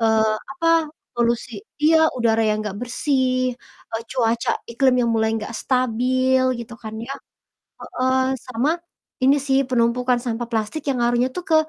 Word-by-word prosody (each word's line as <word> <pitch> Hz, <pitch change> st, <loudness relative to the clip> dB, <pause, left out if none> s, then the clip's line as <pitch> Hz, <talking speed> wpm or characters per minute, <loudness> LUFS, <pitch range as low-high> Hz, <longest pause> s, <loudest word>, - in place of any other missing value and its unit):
eee, 220 Hz, -1 st, +3 dB, 0.2 s
apa, 330 Hz, +2 st, -1 dB, 0.5 s
polusi 240 Hz, +1 st, 0 dB, 0.3 s
iya, 320 Hz, +1 st, +6 dB, 0.2 s
udara 225 Hz, -1 st, +2 dB
yang 215 Hz, 0 st, +1 dB
nggak 205 Hz, -1 st, -5 dB
bersih, 255 Hz, 0 st, 0 dB, 0.4 s
eee, 225 Hz, 0 st, -3 dB
cuaca 235 Hz, -2 st, +1 dB, 0.2 s
iklim 255 Hz, +2 st, +3 dB
yang 235 Hz, -, +1 dB
mulai 220 Hz, 0 st, +2 dB
nggak 215 Hz, 0 st, -5 dB
stabil 255 Hz, +1 st, +1 dB, 0.2 s
gitu 235 Hz, 0 st, -8 dB
kan 220 Hz, -1 st, -7 dB
ya. 275 Hz, -, -5 dB, 0.7 s
Heeh, 260 Hz, +1 st, 0 dB, 0.3 s
sama 255 Hz, +3 st, 0 dB, 0.5 s
ini 270 Hz, +2 st, +6 dB
sih, 265 Hz, -1 st, +3 dB
penumpukan 245 Hz, 0 st, +2 dB
sampah 240 Hz, -1 st, -3 dB
plastik 225 Hz, +7 st, -2 dB
yang 270 Hz, -, +1 dB
ngaruhnya 240 Hz, +1 st, +2 dB
tuh 360 Hz, -, -4 dB
ke 320 Hz, -, +4 dB
245 Hz, 150 wpm, -22 LUFS, 225-260 Hz, 0.7 s, iya